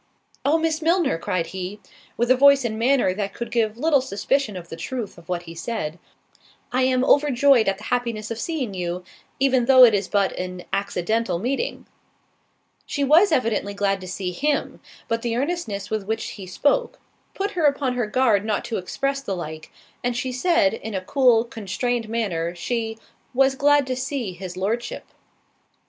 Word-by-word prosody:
"Oh, 295 +4 +3
Miss 320 0 0
Milner," 330 - +2
cried 170 0 -1
he, 190 +2 -5 0.4
(with 240 +2 +2
a - - +7
voice 280 0 +6
and 220 -1 -2
manner 245 -5 +3
that 200 0 -4
could 235 - -5
give 225 -2 0
little 290 0 +3
suspicion 240 -1 -1
of 175 -1 -9
the - - -6
truth 235 +5 -5
of 170 -1 -17
what 175 -1 -2
he 165 -1 -9
said) 170 -2 -4 0.7
"I 255 +1 +1
am 255 0 +2
overjoyed 280 -4 +4
at 195 0 +1
the 210 - -13
happiness 230 -3 -2
of 230 - -4
seeing 275 - -3
you, 180 -1 -3 0.4
even 260 -2 +3
though 260 0 +8
it 235 -3 +8
is 200 -2 0
but 200 -2 +1
an 180 0 -5
accidental 200 +1 0
meeting." 265 - -2 1.0
She 285 - -1
was 325 +8 +5
evidently 225 -7 0
glad 195 -1 0
to 185 - -8
see 185 0 -3
him; 290 +10 -1 0.3
but 230 0 -1
the 230 -1 -1
earnestness 245 - -3
with 215 -3 -2
which 220 +1 -2
he 195 -3 -9
spoke, 380 - +1 0.4
put 400 +1 -2
her 350 -6 0
upon 280 -3 0
her 245 -3 -1
guard 215 -3 +2
not 215 +1 -1
to 235 -2 -2
express 275 +9 -2
the 200 -8 -3
like, 155 -2 -7 0.3
and 245 -1 -1
she 255 0 -2
said, 310 +3 +2
in 220 -2 -6
a 185 -1 -3
cool 250 -4 +4
constrained 235 0 -3
manner, 180 -7 -2
she 225 +2 -3 0.4
"Was 270 +1 +4
glad 290 +1 +3
to 255 0 -2
see 255 -6 -3
his 180 0 -8
Lordship." 225 +6 -2
230 Hz, 180 wpm, -23 LUFS, 195-270 Hz, 1.0 s, though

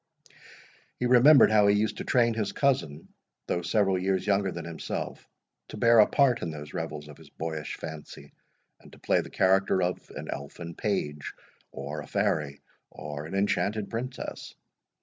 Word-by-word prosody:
He 125 - -2
remembered 125 +2 +7
how 105 -1 +5
he 100 - +5
used 105 +1 0
to - - -4
train 120 -2 +2
his 110 -2 -2
cousin, 85 - 0 0.4
though 85 - -1
several 95 +1 +1
years 95 0 0
younger 100 -1 +1
than 85 -1 -6
himself, 85 -1 -6 0.4
to - - -9
bear 115 -1 +5
a 105 - +7
part 130 -4 +3
in 85 - -3
those 75 -2 -8
revels 75 -1 -5
of 75 - -13
his - - -15
boyish 80 -2 -5
fancy, 80 -2 -9 0.5
and - - -17
to - - -14
play - - +1
the - - -10
character 95 0 +2
of 90 +1 -3
an - - -7
elfin 85 +5 -7
page, 75 -8 -3 0.4
or 70 +2 -6
a 70 - -11
fairy, 70 -2 -1 0.3
or 75 0 -7
an 90 - -6
enchanted 100 +1 0
princess. 125 +3 -6
95 Hz, 170 wpm, -27 LUFS, 75-110 Hz, 0.5 s, remembered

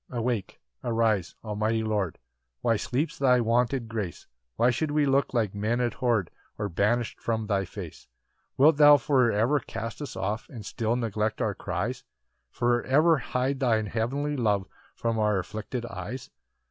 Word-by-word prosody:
8 125 - -4
Awake, 115 -4 -2 0.2
arise, 115 -6 +1
almighty 110 +1 -1
Lord, 105 -6 -1 0.4
Why 115 -1 +2
sleeps 145 +9 -2
thy 125 -2 +4
wonted 120 +1 +1
grace? 110 -6 -5 0.3
Why 120 +2 +4
should 155 +6 -1
we 150 0 +2
look 140 0 +2
like 110 -6 0
men 110 +4 0
abhorr'd, 120 -4 0 0.3
Or 105 -1 -2
banish'd 110 +6 0
from 110 -1 -1
thy 100 -2 0
face? 90 -2 -9 0.5
9 135 - +3
Wilt 155 -1 +6
thou 145 -1 +8
for 130 -4 +3
ever 115 +8 +2
cast 115 +1 -6
us 145 - -6
off 105 +4 -3
And 115 -6 -9
still 110 +3 -1
neglect 110 -3 -1
our 105 - 0
cries? 100 +7 -3 0.5
For 120 0 +1
ever 155 +4 +4
hide 130 +2 -1
thine 115 -5 +2
heavenly 135 +8 -1
love 105 -7 +1 0.3
From 115 -1 -1
our 105 -2 +2
afflicted 110 +6 -4
eyes? 105 +5 -7
115 Hz, 160 wpm, -27 LUFS, 105-125 Hz, 0.5 s, thou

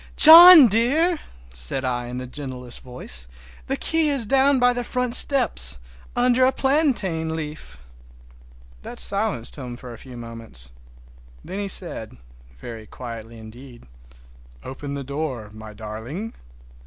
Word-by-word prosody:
"John 330 -1 +11
dear!" 285 - +1 0.3
said 65 - -4
I 120 -1 -3
in 125 +1 -7
the 125 - -6
gentlest 125 -2 -7
voice, 65 - -6 0.4
"the - - -2
key 325 -2 0
is 275 -5 +1
down 270 +4 +2
by 245 0 +3
the 245 0 -4
front 250 0 -1
steps, 235 - +2 0.4
under 250 +1 +2
a 260 - +4
plantain 235 - -1
leaf!" 155 -1 -8 1.0
That - - -8
silenced 200 - +1
him 125 -3 -8
for 125 -2 -11
a 115 - -13
few 125 -2 -12
moments. 115 - -9 0.7
Then 195 - -7
he 200 - -4
said—very 90 - -6
quietly 115 -2 -10
indeed, 120 +3 -14 0.8
"Open 140 +2 -8
the 140 - -6
door, 135 -6 -6
my 110 0 -11
darling!" 110 - -8
135 Hz, 130 wpm, -22 LUFS, -, 1.0 s, John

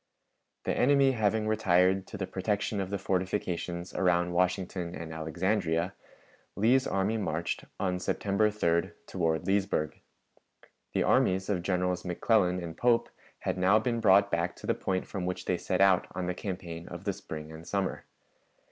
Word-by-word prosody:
The - - -1
enemy 140 +1 +4
having 110 -2 +1
retired 95 -3 +3
to - - -7
the 95 - -2
protection 100 +2 -1
of 95 - -4
the 100 - -1
fortifications 90 -2 -2
around 90 -1 +2
Washington 90 -1 -1
and 80 -1 -7
Alexandria, 85 +2 0 0.6
Lee's 125 +6 +3
army 100 +3 0
marched, 85 -5 -2
on 90 -2 0
September 100 +3 +1
3d, 85 -5 0
toward 85 -2 -1
Leesburg. 95 -5 0 0.9
The - - +2
armies 95 +1 +2
of 95 -4 0
Generals 90 0 0
McClellan 90 0 +2
and 80 -2 -6
Pope 120 -1 +2 0.3
had - - -2
now 95 +4 +5
been 115 +1 0
brought 100 -2 +5
back 85 +1 0
to - - -11
the - - +2
point 95 -1 -2
from 90 -2 -4
which 90 0 -4
they 90 - 0
set 95 - -1
out 95 -2 +5
on 95 - -2
the 90 - -1
campaign 90 -3 -6
of - - -8
the - - -1
spring 80 0 -8
and 80 +1 -10
summer. 100 -2 -2
95 Hz, 160 wpm, -29 LUFS, 90-100 Hz, 0.9 s, now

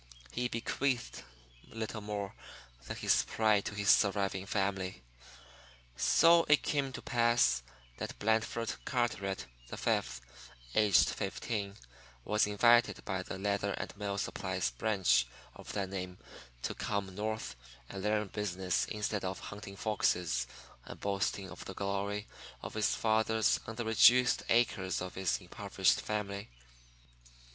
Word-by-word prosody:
He 125 +1 -1
bequeathed 120 +2 -2 0.5
little 110 -1 -5
more 105 -1 -4 0.5
than - - -4
his - - +3
pride 110 -2 +2
to 105 - -4
his 100 -1 +4
surviving 100 -1 +2
family. 95 - -1 0.9
So 170 0 +5
it 150 - +5
came 140 -2 0
to - - -7
pass 120 - +3 0.4
that - - -5
Blandford 110 +2 0
Carteret, 100 - -1 0.2
the - - -7
Fifth, - - 0 0.5
aged 105 -3 +5
fifteen, 100 -3 -3 0.5
was 105 0 +2
invited 115 +4 +4
by 95 -2 -2
the 95 - -6
leather 100 0 0
and - - -5
mill 100 -1 -3
supplies 65 - -2
branch 60 - +2 0.3
of - - -9
that 100 -2 -2
name 90 -1 -5 0.5
to - - -1
come 100 -2 -3
North 110 -4 -3 0.3
and 95 - -6
learn 105 0 0
business 95 -3 -1
instead 105 -1 -2
of 95 0 -2
hunting 100 -1 -8
foxes 90 - 0 0.4
and - - -10
boasting 100 -1 -1
of - - -9
the 95 - -7
glory 100 +1 -2 0.4
of - - -6
his 110 -1 +1
fathers 110 0 +2
on 110 - -5
the 120 - -3
reduced 120 +3 +6
acres 95 -6 +2
of 90 0 -5
his 95 -2 0
impoverished - - +1
family. 100 -1 -3
105 Hz, 135 wpm, -33 LUFS, 95-110 Hz, 0.9 s, reduced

